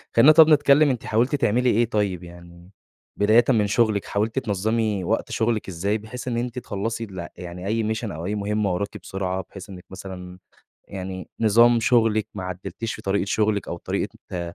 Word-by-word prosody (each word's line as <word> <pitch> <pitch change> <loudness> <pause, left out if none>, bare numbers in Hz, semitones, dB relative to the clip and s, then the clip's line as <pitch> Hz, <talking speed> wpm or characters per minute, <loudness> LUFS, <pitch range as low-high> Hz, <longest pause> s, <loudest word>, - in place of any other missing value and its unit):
خلّينا 135 +7 +8
طب 160 0 +8
نتكلّم 145 0 +5
أنتِ 125 -3 -2
حاولتِ 120 +6 +1
تعملي 125 -1 +2
إيه 120 +1 +3
طيّب 100 -5 -1
يعني، 85 0 -14 0.5
بدايةً 110 +4 +5
من 110 -5 +3
شغلِك 105 -1 +1
حاولتِ 110 +5 -1
تنظّمي 105 -1 -1
وقت 110 +6 -1
شغلِك 115 -2 0
إزاي؟ 95 +4 -1
بحيث 110 +4 -9
إن 120 -2 -1
أنتِ 125 +1 -3
تخلّصي 115 +2 -4
الل 95 -5 -7
يعني 90 +1 -7
أي 110 0 0
mission 110 - -5
أو 80 +2 -6
أي 105 +3 -2
مهمّة 105 -1 -1
وراكِ 100 +3 -3
بسرعة، 95 -1 -4
بحيث 95 0 -11
إنِّك 90 -2 -10
مثلًا 90 -1 -9 0.5
يعني 95 -1 -6
نظام 115 +2 +5
شغلِك 115 -2 +2
ما 95 - -5
عدّلتيش 95 +4 -5
في - - -10
طريقة 100 0 0
شغلِك، 105 0 0
أو 85 - -4
طريقة - - -3 0.2
ت 85 -1 -5
105 Hz, 180 wpm, -23 LUFS, 95-115 Hz, 0.5 s, خلّينا